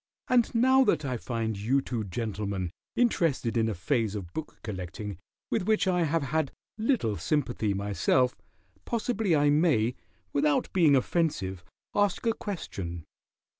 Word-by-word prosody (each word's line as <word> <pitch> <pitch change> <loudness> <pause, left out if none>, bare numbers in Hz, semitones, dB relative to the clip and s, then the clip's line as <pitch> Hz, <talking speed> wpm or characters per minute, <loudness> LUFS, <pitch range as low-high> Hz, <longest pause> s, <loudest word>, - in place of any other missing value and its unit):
And 245 -2 +3
now 260 +3 +5
that 155 - +2
I 130 -2 -1
find 115 -2 -2
you 125 +7 +2
two 120 -4 -3
gentlemen 100 -3 -3 0.2
interested 165 - +1
in 115 -1 +2
a 110 - -2
phase 110 - 0
of 90 -5 -6
book 160 - -6
collecting 100 -1 -5 0.3
with 205 -5 0
which 215 -2 +3
I 180 -2 +2
have 160 0 +1
had 145 +1 0 0.3
little 215 - +1
sympathy 115 - 0
myself, 105 +6 +1 0.5
possibly 220 -6 0
I 145 0 +4
may, 145 -7 +3 0.4
without 145 0 +1
being 160 -6 +5
offensive, 125 - 0 0.3
ask 205 0 +1
a 230 - +3
question. 95 - -5
130 Hz, 140 wpm, -28 LUFS, 105-175 Hz, 0.5 s, now